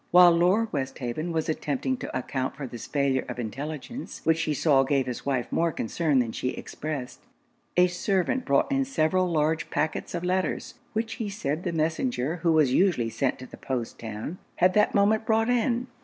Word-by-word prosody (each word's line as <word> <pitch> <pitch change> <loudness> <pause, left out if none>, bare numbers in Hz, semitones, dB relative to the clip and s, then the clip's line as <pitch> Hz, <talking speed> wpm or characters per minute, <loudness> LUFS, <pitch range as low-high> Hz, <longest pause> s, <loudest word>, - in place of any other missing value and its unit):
While 180 0 +8
Lord 185 +7 +2
Westhaven 135 +3 -3
was 160 -1 -1
attempting 260 - -1
to 245 - -4
account 130 0 -3
for 140 0 -5
this 120 -3 -8
failure 140 -2 +1
of 125 - -5
intelligence, 145 - -6
which 160 0 +2
he 155 - 0
saw 140 -2 +4
gave 135 -1 +1
his 125 +2 -5
wife 130 -4 -1
more 170 0 +2
concern 150 +3 0
than 120 -3 +2
she 125 - -2
expressed, 145 -5 -5 0.6
a 180 - +7
servant 190 +7 0
brought 140 - +2
in 275 0 +2
several 185 -7 +1
large 160 0 +1
pacquets 155 +2 -2
of 170 - -3
letters, 185 +1 -1 0.2
which 225 +1 -2
he 210 - -2
said 155 -6 -2
the 175 - -1
messenger 160 - -1
who 165 0 +1
was 150 -5 +4
usually 145 -10 +2
sent 130 +3 0
to 130 - -9
the - - -12
post 125 -4 -4
town, 115 - -6 0.2
had 185 +1 +4
that 210 - +3
moment 210 +2 +3
brought 225 +1 +3
in. 245 0 +1
160 Hz, 185 wpm, -27 LUFS, 135-185 Hz, 0.6 s, While